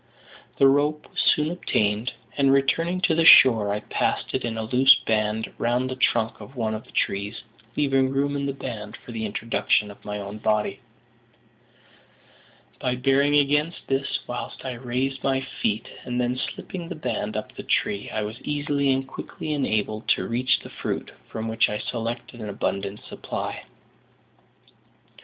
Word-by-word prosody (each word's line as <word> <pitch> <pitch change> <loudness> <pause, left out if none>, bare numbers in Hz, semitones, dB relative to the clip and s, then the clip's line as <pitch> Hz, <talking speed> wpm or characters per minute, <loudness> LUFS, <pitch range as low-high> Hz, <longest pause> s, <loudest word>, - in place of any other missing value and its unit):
The 135 - +6
rope 145 +2 +2
was - - -1
soon 150 +2 +3
obtained; 110 - 0 0.2
and, 135 -1 +4
returning 165 +7 +2
to 180 - +3
the 165 +1 +3
shore, 115 -9 +8
I 105 +1 -1
passed - - -1
it 130 - 0
in 115 -1 -2
a 110 - -2
loose 125 +4 +6
band 110 0 0
round 125 +2 +1
the - - -3
trunk 110 -3 +1
of 120 +7 -11
one 110 -3 -1
of 110 - -5
the - - -18
trees, 100 +3 -1 0.3
leaving 135 -2 +3
room 140 +1 0
in 140 0 -1
the - - 0
band 110 -6 -6
for - - -12
the 110 -1 -3
introduction 105 0 +1
of 100 - -16
my 105 0 -4
own 100 +1 -6
body. 105 0 0 2.0
By 125 0 0
bearing 135 +3 +3
against 150 +3 +2
this 135 +1 0
whilst 120 +2 -6
I 130 - -2
raised 130 +2 -2
my 135 -1 +2 0.2
feet 110 +2 0 0.2
and 125 -1 -2
then 125 0 +1
slipping 170 +6 -5
the 180 - -4
band 110 -7 -3
up 110 - -5
the - - -6
tree, 100 0 0
I 110 - -2
was 110 +4 -6
easily 145 -1 0
and 135 0 0
quickly 155 +3 -5
enabled 110 -6 -1
to - - -4
reach 125 +2 +1
the - - -11
fruit, - - -4 0.2
from 110 0 -4
which 110 0 +2
I 105 - -2
selected 120 +2 -4
an 105 - -5
abundant 100 0 -3
supply. - - -5
125 Hz, 170 wpm, -25 LUFS, 110-140 Hz, 2.0 s, shore